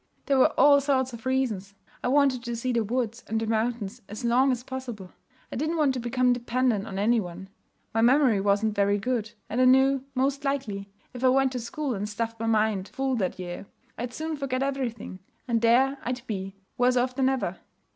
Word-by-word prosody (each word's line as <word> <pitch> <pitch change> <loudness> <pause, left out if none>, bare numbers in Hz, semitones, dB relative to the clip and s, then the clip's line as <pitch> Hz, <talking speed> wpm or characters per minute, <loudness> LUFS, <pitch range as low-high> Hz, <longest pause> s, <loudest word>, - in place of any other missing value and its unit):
There 275 -2 +2
were - - +6
all 285 +1 +7
sorts 260 -2 0
of 235 +2 -7
reasons. 220 -7 -1 0.3
I - - 0
wanted 270 -2 +3
to 235 0 -3
see 250 +2 -2
the 230 -1 +2
woods 235 +1 -2
and 225 +1 -1
mountains 225 -2 -1
as 215 +4 -6
long 255 +3 +4
as 245 -1 -2
possible. 245 -8 -7 0.4
I - - -5
didn't 315 +5 -1
want 295 -4 +3
to 255 - -3
become 250 +1 +2
dependent 240 -3 0
on 195 - -6
any 225 +4 +3
one. 185 0 -7 0.4
My 225 - +2
memory 245 -3 +4
wasn't 205 +2 +2
very 200 0 +2
good; 230 0 -2
and 240 +4 -1
I - - +5
knew, 265 +1 +4
most 275 +2 0
likely, 225 -8 -2 0.2
if 250 0 -7
I 260 - +6
went 265 0 +3
to 255 - -3
school 265 +4 -3
and 205 0 -3
stuffed 230 +1 -4
my 225 - -2
mind 215 -3 +1
full 270 -1 -1
that 190 -4 -1
year, 180 +1 -7 0.3
I'd 245 +1 -5
soon 315 +4 -4
forget 270 -2 -1
everything, 250 -8 -3 0.3
and 230 -2 +1
there 260 +4 +3
I'd 250 +1 -4
be 195 -3 -5 0.2
worse 250 +1 +4
off 250 +1 +1
than 265 0 +2
ever. 205 -9 -2
245 Hz, 205 wpm, -26 LUFS, 215-260 Hz, 0.4 s, all